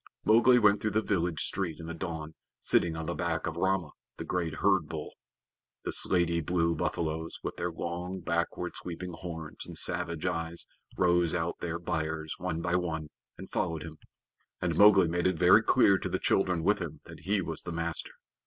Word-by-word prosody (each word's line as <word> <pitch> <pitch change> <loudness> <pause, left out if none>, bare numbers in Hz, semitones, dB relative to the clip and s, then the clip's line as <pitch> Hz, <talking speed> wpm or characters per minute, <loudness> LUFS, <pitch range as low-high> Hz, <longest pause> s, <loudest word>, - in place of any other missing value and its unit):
Mowgli 120 +3 +6
went 105 -3 +4
through 110 - +1
the 110 - +2
village 85 -6 0
street 90 -5 -3
in 80 - -7
the 85 - -5
dawn, 80 -2 -5 0.3
sitting 80 -2 +1
on 80 - -4
the - - -2
back 85 -1 -2
of 80 - -3
Rama, 90 -2 0 0.3
the - - -5
great 85 -3 -2
herd - - +2
bull. - - -6 0.7
The - - -2
slaty 85 -2 +3
blue 85 +1 +1
buffaloes, 80 0 -2
with - - -4
their 90 - -2
long, 90 +3 -4
backward 85 +1 -2
sweeping 90 +1 -6
horns 85 -2 -7
and - - -9
savage 85 -1 -1
eyes, 85 -1 -1 0.3
rose 90 -2 +3
out 85 0 -2
their 85 -1 -3
byres, 80 -2 -3
one 80 +1 -3
by 85 - +1
one, 80 -4 -3 0.3
and - - -10
followed 80 -2 -1
him, 80 -1 -10 0.6
and 85 -3 -1
Mowgli 95 -2 +7
made 85 +2 +1
it 90 -2 0
very - - +7
clear 95 -1 +4
to - - -3
the - - 0
children 90 -4 +1
with 105 +4 +3
him 80 -4 -6
that - - -11
he 100 +2 0
was 85 -4 -3
the 85 - -6
master. 80 0 -3
85 Hz, 190 wpm, -30 LUFS, 80-90 Hz, 0.7 s, Mowgli